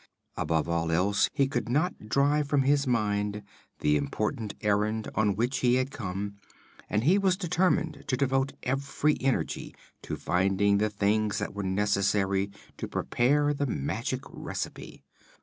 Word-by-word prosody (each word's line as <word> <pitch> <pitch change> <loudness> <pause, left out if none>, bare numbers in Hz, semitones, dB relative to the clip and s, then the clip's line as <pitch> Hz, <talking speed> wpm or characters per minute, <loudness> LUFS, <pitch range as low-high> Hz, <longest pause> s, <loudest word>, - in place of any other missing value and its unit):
Above 80 -1 0
all 85 -1 0
else, 95 +5 +2
he 140 -2 +2
could 120 -5 -2
not 145 - -1
drive 145 +3 +2
from 140 -1 +2
his 140 +1 +2
mind 105 -3 0 0.4
the 75 - +3
important 105 - -2
errand 105 +1 +1
on 105 -2 +2
which 120 +6 0
he 125 -1 +3
had 130 +1 0
come, 100 -5 -4 0.5
and 105 +1 +1
he 180 +9 +4
was 190 -2 +2
determined 180 -3 0
to 125 - 0
devote 135 0 +1
every 140 +3 0
energy 125 -12 -1 0.3
to - - -4
finding 100 +2 +2
the 105 +1 +2
things 105 +1 +1
that - - -3
were 100 - -4
necessary 100 0 +1 0.3
to - - -4
prepare 145 +4 +1
the 145 0 -1
magic 70 - -2
recipe. - - -6
110 Hz, 150 wpm, -28 LUFS, 100-140 Hz, 0.5 s, he